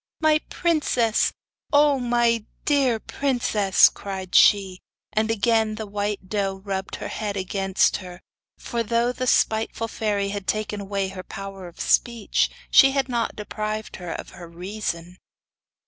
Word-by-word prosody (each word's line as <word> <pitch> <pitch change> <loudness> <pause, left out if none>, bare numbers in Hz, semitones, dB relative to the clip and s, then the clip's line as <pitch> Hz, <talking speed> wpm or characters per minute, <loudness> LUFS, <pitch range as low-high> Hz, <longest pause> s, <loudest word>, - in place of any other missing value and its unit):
'My 310 -1 +4
princess! 290 -9 +1 0.4
O 290 -1 +4
my 240 -2 +2 0.2
dear 270 -6 +2
princess!' 220 -8 +3
cried 190 -2 -6
she; 195 -3 +5 0.3
and 220 +1 +1
again 225 0 +2
the 220 0 -5
white 205 -1 -3
doe 195 -1 -1
rubbed 190 -1 -3
her - - -6
head 205 -2 -4
against 195 0 +1
her, 180 -2 -10 0.4
for 235 - -3
thought 235 +2 0
the 255 - -2
spiteful 225 0 +1
fairy 205 -3 -1
had 200 -1 -5
taken 215 -1 -2
away 195 -1 -2
her 190 -1 -7
power 195 -1 -8
of 175 - -15
speech, 235 -3 +1 0.2
she 270 -1 +7
had 270 -1 0
not 235 -2 -1
deprived 215 0 -5
her 180 -2 -6
of - - -6
her 175 -1 -11
reason! 180 -1 -5
210 Hz, 145 wpm, -24 LUFS, 195-235 Hz, 0.4 s, she